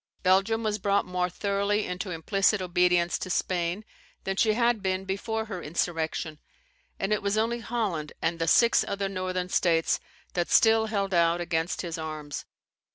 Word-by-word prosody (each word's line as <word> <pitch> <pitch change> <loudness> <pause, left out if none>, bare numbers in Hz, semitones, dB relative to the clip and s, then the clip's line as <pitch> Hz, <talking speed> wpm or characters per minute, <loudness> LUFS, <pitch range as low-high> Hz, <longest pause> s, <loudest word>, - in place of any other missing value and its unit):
Belgium 195 +5 +3
was 215 -1 -1
brought 200 +1 +1
more 180 0 -1
thoroughly 200 +3 0
into 180 +2 -4
implicit 195 +5 +1
obedience 180 -1 +2
to 185 - -5
Spain 180 +2 -1 0.4
than 195 - -2
she 215 +2 +3
had 235 -1 +2
been 190 0 -1
before 220 +3 -2
her 190 -5 -6
insurrection, 160 -1 -2 0.6
and 195 +2 0
it 210 - 0
was 200 +1 0
only 230 +2 +1
Holland 210 -10 -2
and 165 0 -1
the 165 - 0
six 235 -1 +5
other 200 0 -2
Northern 185 -1 -3
States 165 -3 +2 0.3
that 175 -1 -1
still 225 0 +5
held 200 -3 -1
out 170 0 +3
against 165 -2 -1
his 165 -1 -4
arms. 155 -2 -5
185 Hz, 160 wpm, -27 LUFS, 170-210 Hz, 0.6 s, six